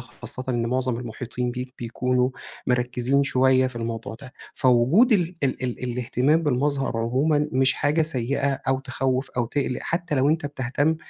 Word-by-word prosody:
خاصّةً 130 Hz, -, -6 dB
إنّ 120 Hz, -2 st, 0 dB
مُعظم 125 Hz, 0 st, 0 dB
المحيطين 125 Hz, +1 st, -4 dB
بيك 125 Hz, +1 st, -6 dB
بيكونوا 125 Hz, +2 st, 0 dB, 0.4 s
مركّزين 125 Hz, +2 st, +1 dB
شُويّة 130 Hz, -1 st, +3 dB
في 130 Hz, -2 st, -7 dB
الموضوع 115 Hz, -1 st, -4 dB
ده، 125 Hz, +1 st, -12 dB, 0.2 s
فوجود 130 Hz, -, +4 dB
ال 175 Hz, -3 st, +1 dB
ال 130 Hz, -1 st, -1 dB
ال 125 Hz, -1 st, -3 dB
الاهتمام 125 Hz, +6 st, +1 dB
بالمظهر 140 Hz, -2 st, 0 dB
عُمومًا 145 Hz, +6 st, +1 dB
مش 130 Hz, 0 st, +4 dB
حاجة 150 Hz, +3 st, +1 dB
سيّئة 140 Hz, -1 st, 0 dB, 0.2 s
أو 135 Hz, 0 st, +2 dB
تخوّف 130 Hz, 0 st, -2 dB
أو 120 Hz, -2 st, -1 dB
تقلّق 130 Hz, 0 st, -2 dB
حتّى 170 Hz, -2 st, -2 dB
لو 135 Hz, +1 st, +3 dB
أنتَ 155 Hz, -1 st, +1 dB
بتهتمّ 145 Hz, +3 st, 0 dB
130 Hz, 155 wpm, -24 LUFS, 125-145 Hz, 0.4 s, فوجود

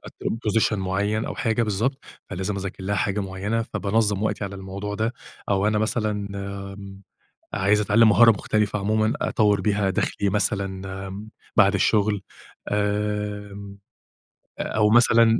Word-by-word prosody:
أتقدِّم 115 Hz, -, -4 dB
Position 110 Hz, +1 st, +2 dB
معيّن 100 Hz, +3 st, -1 dB
أو -, -, -4 dB
حاجة 115 Hz, -1 st, 0 dB
بالضبط، 115 Hz, +6 st, -1 dB, 0.3 s
فلازم 95 Hz, +3 st, -3 dB
أذاكر 95 Hz, 0 st, -5 dB
لها 100 Hz, +2 st, 0 dB
حاجة 100 Hz, 0 st, 0 dB
معيَّنة، 100 Hz, +4 st, -2 dB
فبانظَّم 105 Hz, -2 st, 0 dB
وقتي 110 Hz, -1 st, -1 dB
على 100 Hz, 0 st, -6 dB
الموضوع 100 Hz, +1 st, -5 dB
ده، 110 Hz, +3 st, -1 dB, 0.4 s
أو 100 Hz, 0 st, +2 dB
أنا 105 Hz, 0 st, +2 dB
مثلًا، 105 Hz, -2 st, -1 dB, 0.4 s
آمم، 100 Hz, 0 st, -10 dB, 0.5 s
عايز 100 Hz, +2 st, +3 dB
أتعلم 110 Hz, +2 st, +5 dB
مهارة 115 Hz, +2 st, +7 dB
مختلفة 105 Hz, 0 st, 0 dB
عمومًا، 110 Hz, +2 st, +1 dB
أطوَّر 105 Hz, -1 st, +2 dB
بيها 100 Hz, -2 st, +1 dB
دخلِي 100 Hz, +1 st, 0 dB
مثلًا، 100 Hz, 0 st, 0 dB, 0.4 s
آمم، 100 Hz, +3 st, -8 dB, 0.3 s
بعد 100 Hz, -1 st, +5 dB
الشُغل، 105 Hz, +1 st, +2 dB, 0.5 s
آمم، 105 Hz, -1 st, -2 dB, 0.8 s
آآ، -, -, 0 dB
أو 105 Hz, -1 st, +2 dB
مثلًا 115 Hz, 0 st, +5 dB
105 Hz, 140 wpm, -24 LUFS, 100-110 Hz, 0.8 s, مهارة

